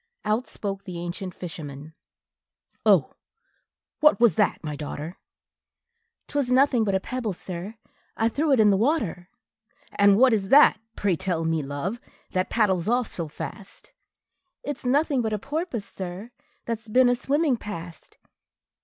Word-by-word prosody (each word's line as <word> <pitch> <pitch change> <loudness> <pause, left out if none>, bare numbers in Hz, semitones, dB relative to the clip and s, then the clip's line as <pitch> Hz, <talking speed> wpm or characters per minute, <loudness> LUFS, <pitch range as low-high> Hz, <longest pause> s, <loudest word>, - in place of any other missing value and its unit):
Out 220 +4 0
spoke 195 -1 -5
the 180 -2 -6
ancient 175 +2 -5
fisherman, 155 -3 -8 0.9
"Oh, - - +4 0.9
what 300 -4 +5
was 235 -2 +5
that, 210 -5 +1
my 150 -2 -4
daughter?" 150 +3 -6 1.1
"'T - - -15
was 255 -3 -1
nothing 255 -2 +4
but 200 -2 0
a - - +2
pebble, 235 -1 -3
sir, 180 +4 -7 0.4
I 225 - +2
threw 290 +6 0
into 230 -5 +5
the 195 - +3
water." 215 - 0 0.6
"And 200 -1 +5
what 255 +1 +6
is 195 -3 0
that, 275 -6 +7 0.2
pray 195 -4 +1
tell 175 -2 -2
me, 160 -1 +1
love, 145 +11 -4 0.3
that 185 -1 0
paddles 195 -5 +1
off 245 -1 +1
so 165 -2 -4
fast?" 200 - -9 0.7
"It's 285 -3 -5
nothing 280 0 +2
but 220 -2 -1
a - - +1
porpoise, 280 - -4
sir, 190 +5 -7 0.3
that 230 -2 -2
's 225 - -21
been 250 +4 +4
a 245 - +4
swimming 285 +2 +1
past." 175 -7 -9
210 Hz, 155 wpm, -25 LUFS, 180-250 Hz, 1.1 s, that